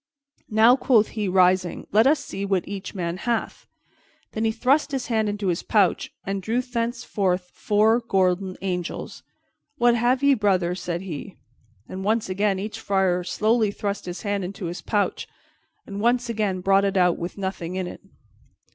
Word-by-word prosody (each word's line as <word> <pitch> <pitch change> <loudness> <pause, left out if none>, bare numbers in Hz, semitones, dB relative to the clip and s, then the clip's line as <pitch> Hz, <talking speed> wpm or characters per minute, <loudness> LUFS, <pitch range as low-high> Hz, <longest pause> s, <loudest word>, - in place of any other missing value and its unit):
"Now," 220 +3 +6
quoth 235 -5 +3
he, 215 -3 -3
rising, 185 -1 +2
"let 220 +5 +5
us 300 +2 +2
see 195 - -5
what 195 -3 0
each 195 +1 -6
man 175 -2 -3
hath." 235 +4 -3 0.6
Then 220 +1 -2
he 220 - +2
thrust 260 +7 +2
his 270 -3 -2
hand 220 -1 +1
into 205 -2 -2
his 175 - -1
pouch 200 -5 +1
and 195 0 -2
drew 225 +6 0
thence 240 -1 -3
four 185 -3 0 0.7
golden 185 -1 +1
angels. 180 -3 -4 0.6
"What 240 -2 +4
have 245 +3 +1
ye, 280 0 +6
brothers?" 190 -6 +1
said 175 0 -3
he. 185 +1 -7 0.5
Then 185 - -6
once 215 +1 0
again 195 +1 +1
each 210 +3 -5
friar 190 -4 +1
slowly 215 +4 +1
thrust 200 0 -4
his 175 0 -6
hand 200 -2 -1
into 185 +1 -6
his 170 +1 -5
pouch, 205 -2 -1 0.6
and 200 -1 -6
once 240 +1 +2
again 205 -5 -1
brought 195 +1 +4
it 195 0 0
out 180 -2 +3
with 175 +4 -5
nothing 190 -3 -4
in 185 -1 -2
it. - - -8
200 Hz, 170 wpm, -24 LUFS, 185-225 Hz, 0.7 s, Now